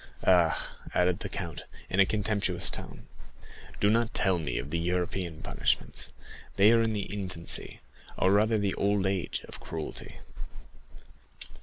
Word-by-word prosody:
Ah," 90 -3 +3 0.2
added 90 -1 +3
the - - -5
count, - - -5 0.3
in 95 - -1
a 95 - +7
contemptuous 100 -4 0
tone, - - -8 0.7
"do 100 - +3
not 115 +2 +2
tell 95 -3 +3
me 60 -7 -2
of 65 +6 -5
European 90 -1 -1
punishments, - - -1 0.5
they 100 +3 +6
are 115 0 +5
in 115 -1 +1
the 100 -2 -2
infancy, 90 -4 -2 0.4
or 95 - +3
rather 110 +2 +4
the 100 -2 0
old 100 -1 +1
age, 95 -2 -1
of - - -10
cruelty." 80 -1 -7
95 Hz, 140 wpm, -29 LUFS, 85-105 Hz, 0.7 s, a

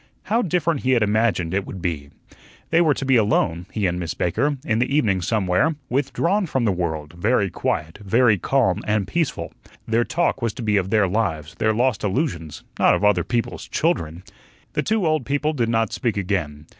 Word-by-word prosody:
How 225 +5 +1
different 170 - 0
he 130 0 +1
had 120 -3 +3
imagined 105 -5 +1
it 100 0 -1
would 95 - -7
be! 80 -5 -3 0.6
They 165 +1 +4
were 155 -4 +3
to 135 - -4
be 130 -2 +4
alone 90 -5 +1
he 105 -3 -1
and 90 -1 0
Miss 85 -2 -4
Baker 140 - 0
in 110 0 +1
the 125 - 0
evening 105 -11 +2
somewhere, 105 - +1
withdrawn 170 - 0
from 130 -5 0
the 105 - +3
world, 80 -4 -3
very 100 +2 +1
quiet, 80 0 -2
very 110 0 +3
calm 120 -8 +1
and 105 -2 +1
peaceful. 165 +4 -2 0.3
Their 115 +1 +2
talk 165 -1 0
was 115 -2 -1
to 120 - -7
be 105 -1 +1
of 95 -1 0
their 105 -2 +3
lives, 90 -7 -2
their 110 - +1
lost 120 0 0
illusions, 95 - -2 0.2
not - - +5
of - - -3
other 105 -4 +3
people's 120 -2 -3
children. 80 +2 -1 0.5
The - - 0
two 215 -3 0
old 155 -3 +1
people 145 +4 0
did 120 -6 0
not 115 -2 0
speak 115 -4 -1
again. 80 -7 -2
110 Hz, 195 wpm, -22 LUFS, 90-135 Hz, 0.6 s, not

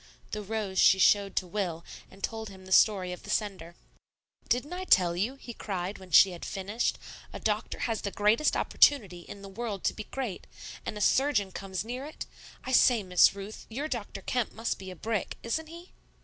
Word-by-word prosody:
The 210 - -3
rose 205 -2 -3
she 190 - +7
showed 200 +1 +4
to - - 0
Will, 175 -3 -3 0.2
and 195 +1 -17
told 220 -1 -3
him 190 -1 -13
the 190 - -11
story 190 -2 +4
of 180 - -7
the - - -12
sender. 185 -5 -2 0.7
"Didn't 275 +7 0
I 365 +1 -4
tell 180 - +4
you," 215 +9 -1
he 250 -3 -9
cried, 195 -2 -4
when 190 -1 -13
she 190 +1 +7
had 175 - -9
finished, 200 +5 -2 0.3
"a - - -7
doctor 215 0 -1
has 225 -3 -1
the 200 - -2
greatest 210 +9 +2
opportunity 200 -12 +3
in 200 +3 -11
the - - -8
world 200 0 -5
to - - +1
be 215 - -7
great 245 -8 -5 0.4
and 210 - -3
a - - -5
surgeon 230 -5 +2
comes 190 +1 -5
near 250 +3 -5
it? 300 +2 -7 0.4
I 260 - -4
say, 245 -3 +5
Miss 180 +1 +5
Ruth, 200 +2 -9
your 275 +7 -3
Dr. 220 -8 -5
Kemp 245 -3 -1
must 225 +1 -3
be 190 -1 -8
a 185 - -8
brick. 215 +3 -3
Isn't 315 +8 -2
he?" 340 +3 -12
205 Hz, 205 wpm, -29 LUFS, 190-235 Hz, 0.7 s, she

